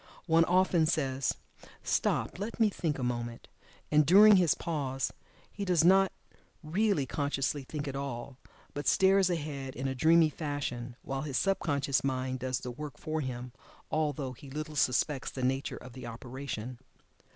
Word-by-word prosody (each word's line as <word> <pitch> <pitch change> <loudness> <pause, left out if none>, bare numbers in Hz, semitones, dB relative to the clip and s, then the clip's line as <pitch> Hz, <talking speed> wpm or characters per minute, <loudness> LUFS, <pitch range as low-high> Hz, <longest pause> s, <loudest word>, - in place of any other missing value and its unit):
One 165 -1 +4
often 180 -2 +3
says 135 -5 0 0.5
"stop, - - 0
let 215 +4 -5
me 220 -2 +4
think 160 -5 -2
a 130 - -4
moment," 120 -1 -3 0.4
and 150 0 +6
during 200 +6 +8
his 175 -5 +3
pause 135 -5 -2 0.4
he 200 - -5
does 180 -4 +3
not 190 +2 +5 0.5
really 175 -1 +1
consciously 140 +1 -1
think 150 +1 -5
at 135 - -4
all, 135 -1 -5 0.3
but 145 - -4
stares 190 -1 +4
ahead 145 -6 -4
in 135 +2 -3
a 135 - -1
dreamy 160 +4 +5
fashion, 135 -6 -4
while 135 0 -3
his 140 -3 -2
sub 195 -1 +1
conscious 140 -3 0
mind 130 -1 -1
does 130 0 -2
the 125 - -5
work 150 +2 -7
for 155 0 -3
him, 125 -2 -5 0.4
although 145 -4 -1
he 135 +3 -13
little 155 +2 -5
suspects 135 +1 +1
the 130 - -5
nature 135 +2 -1
of 125 -1 -11
the 130 - -8
operation. 125 0 -6
145 Hz, 160 wpm, -30 LUFS, 130-165 Hz, 0.5 s, during